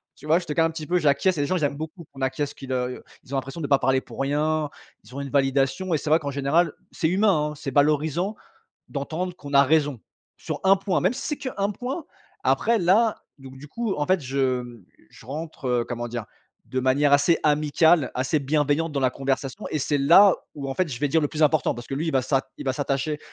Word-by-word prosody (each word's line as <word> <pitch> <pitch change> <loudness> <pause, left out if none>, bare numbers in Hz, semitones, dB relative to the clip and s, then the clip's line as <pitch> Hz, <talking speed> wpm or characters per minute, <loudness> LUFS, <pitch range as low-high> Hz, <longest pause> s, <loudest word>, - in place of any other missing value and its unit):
tu - - -15
vois, 160 +3 +4
je 175 - -9
te 150 - -3
calme 165 +1 +3
un - - -6
petit 155 -2 -7
peu, 180 +1 +2
j'acquiesce. 155 +4 +2
Et - - 0
les 145 - 0
gens, 185 - +1
ils 155 - -2
aiment 140 0 0
beaucoup 160 +2 -7
qu'on 135 -1 -11
acquiesce 140 +2 -1
qu'ils, 135 -1 -8
heu, 125 0 -1
i - - -7
heu, - - -13 0.2
ils 135 +1 -12
ont - - +1
l'impression 135 +5 -5
de 145 - -2
pas 140 - +4
parler 130 +1 +2
pour - - -12
rien, 150 +2 0 0.3
ils 115 +4 -16
ont 140 - -4
une 140 - -5
validation. 135 +6 +1
Et - - +3
c'est 150 - -4
vrai 155 - +6
qu'en 140 -2 -4
général, 140 +5 +1 0.2
c'est 160 - -1
humain, 185 -5 +2
hein, - - -7
c'est 135 -1 -5
valorisant 155 +7 +1 0.6
d'entendre 160 +6 -3
qu'on 145 0 -8
a 140 - +8
raison 145 -4 +1 0.4
sur - - -5
un 195 +1 +6
point, 195 -1 -1
même 185 +8 +1
si 270 - -6
c'est 295 - -2
qu'un 205 -6 -2
point. 260 - -5 0.4
Après, 230 -1 +2
là, 205 +5 +3 0.2
donc 135 -1 -12
du 145 - -11
coup, 230 +2 -2
en 150 - -1
fait, 185 -2 +2
je, 135 0 -4 0.2
hem 120 -5 -11 0.3
je 115 - -16
rentre, 150 0 -6
heu, 120 -1 +1
comment 120 0 -3
dire? 120 -2 -4 0.4
De 130 - -2
manière 140 +3 +2
assez 165 +4 +3
amicale, 150 +1 +3
assez 130 +4 0
bienveillante 150 +2 0
dans 140 - -1
la 130 - +3
conversation 135 +8 -3
et 155 - -1
c'est 145 +1 0
là 175 +8 +7 0.2
où, 140 -2 -5
en 135 - -3
fait, 185 - +1
je 125 -1 -6
vais 145 - +1
dire 160 +3 +2
le - - +2
plus 155 0 -2
important 150 -1 +3
parce 120 0 -9
que 135 - -4
lui, 160 +4 -2
il - - -1
va 130 -1 +2
s'a 135 +1 +1 0.2
il - - -6
va 130 - +1
s'attacher 145 +2 -1
145 Hz, 255 wpm, -24 LUFS, 135-165 Hz, 0.6 s, a